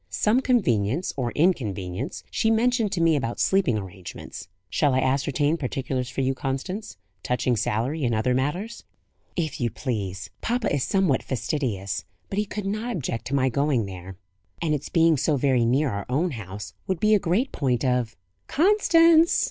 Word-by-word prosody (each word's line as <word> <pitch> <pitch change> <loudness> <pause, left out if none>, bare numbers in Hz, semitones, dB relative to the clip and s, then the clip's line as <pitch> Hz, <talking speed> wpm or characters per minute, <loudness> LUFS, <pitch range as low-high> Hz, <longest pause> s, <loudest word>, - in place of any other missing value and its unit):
"Some 220 +4 +2
convenience, 160 - +1
or 125 -3 -2
inconvenience, 115 - -1
she 220 - +1
mentioned 225 -1 +2
to 175 - 0
me, 165 -1 +4
about 120 -4 -2
sleeping 190 - +2
arrangements. 95 -3 -8 0.2
Shall 135 - +1
I - - +3
ascertain 140 +4 +1
particulars 130 -2 -3
for 130 - -3
you, 135 0 +1
Constance; 135 - -4 0.2
touching 125 0 0
salary 125 +8 -1
and 120 -2 +1
other 120 +4 +1
matters?" 160 - -2 0.5
"If 155 -6 -2
you 120 - +1
please. 100 -6 -4
Papa 240 -4 0
is 140 -3 +1
somewhat 190 -9 +2
fastidious; 110 - -2 0.3
but 195 - 0
he 210 - +1
could 210 0 -5
not 215 +5 -2
object 120 -7 -3
to 140 - -1
my 130 -1 +3
going 135 -3 +1
there; 95 -1 -9 0.4
and 160 -3 0
its 145 - -3
being 165 -2 +4
so 145 +2 +1
very 130 -3 +2
near 130 +4 +2
our 100 -1 -4
own 160 +7 +1
house 105 -4 -7
would 185 -3 -1
be 215 +3 +4
a 210 - +5
great 195 +9 0
point 130 -2 0
of 125 -3 0 0.2
" 90 - -47
"Constance!" 335 -3 +5
135 Hz, 170 wpm, -25 LUFS, 120-185 Hz, 0.5 s, a